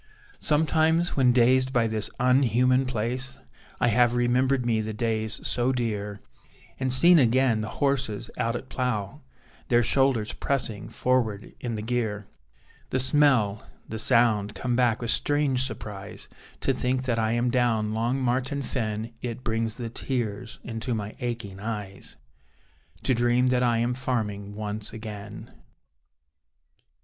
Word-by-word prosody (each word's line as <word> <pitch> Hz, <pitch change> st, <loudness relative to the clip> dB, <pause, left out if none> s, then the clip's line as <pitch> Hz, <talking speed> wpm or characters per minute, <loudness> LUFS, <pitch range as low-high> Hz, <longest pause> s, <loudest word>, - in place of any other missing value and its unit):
Sometimes, 160 Hz, +2 st, +2 dB
when 130 Hz, -3 st, +4 dB
dazed 130 Hz, +1 st, +4 dB
by 120 Hz, -3 st, +2 dB
this 110 Hz, -1 st, +2 dB
un 125 Hz, +2 st, +4 dB
human 125 Hz, +1 st, +2 dB
place 125 Hz, +2 st, -2 dB, 0.4 s
I 120 Hz, -, +3 dB
have 120 Hz, +1 st, +3 dB
remembered 125 Hz, +1 st, +2 dB
me 115 Hz, -2 st, +1 dB
the 110 Hz, 0 st, -5 dB
days 110 Hz, -1 st, -1 dB
so 125 Hz, +1 st, +1 dB
dear, 105 Hz, -5 st, -3 dB, 0.6 s
And 130 Hz, -1 st, 0 dB
seen 170 Hz, +7 st, +7 dB
again 125 Hz, -2 st, +3 dB
the 110 Hz, -, -4 dB
horses 130 Hz, -6 st, 0 dB
out 115 Hz, +1 st, -1 dB
at 130 Hz, -, -6 dB
plough, 110 Hz, -8 st, -3 dB, 0.5 s
Their 120 Hz, 0 st, +3 dB
shoulders 120 Hz, -3 st, +2 dB
pressing 125 Hz, -6 st, -2 dB
forward 115 Hz, -5 st, -1 dB
in 120 Hz, -2 st, -4 dB
the 105 Hz, -, -4 dB
gear: 110 Hz, -3 st, -2 dB, 0.6 s
The -, -, 0 dB
smell, 130 Hz, -6 st, +3 dB, 0.2 s
the 110 Hz, -, -4 dB
sound, 115 Hz, -4 st, +3 dB
come 125 Hz, -1 st, -1 dB
back 120 Hz, -2 st, +2 dB
with 120 Hz, -, 0 dB
strange 145 Hz, -3 st, +1 dB
surprise, 105 Hz, -5 st, -7 dB, 0.3 s
To -, -, +2 dB
think 130 Hz, +1 st, -1 dB
that 120 Hz, -3 st, 0 dB
I 110 Hz, 0 st, +1 dB
am 120 Hz, +1 st, +1 dB
down 115 Hz, -4 st, +1 dB
Long 120 Hz, +4 st, 0 dB
Martin 130 Hz, +2 st, -1 dB
Fen; 115 Hz, -2 st, -3 dB
It 120 Hz, 0 st, -5 dB
brings 115 Hz, -1 st, -1 dB
the 115 Hz, -2 st, -5 dB
tears 115 Hz, -3 st, -3 dB
into 115 Hz, +1 st, -3 dB
my 105 Hz, -1 st, -5 dB
aching 115 Hz, -6 st, -4 dB
eyes, 105 Hz, -2 st, -5 dB, 0.9 s
To 130 Hz, -, +2 dB
dream 120 Hz, +1 st, +2 dB
that 125 Hz, -1 st, +2 dB
I 120 Hz, -2 st, +2 dB
am 120 Hz, +2 st, 0 dB
farming 105 Hz, -6 st, -3 dB
once 105 Hz, 0 st, -5 dB
again. 105 Hz, -2 st, -8 dB
120 Hz, 145 wpm, -26 LUFS, 110-130 Hz, 0.9 s, seen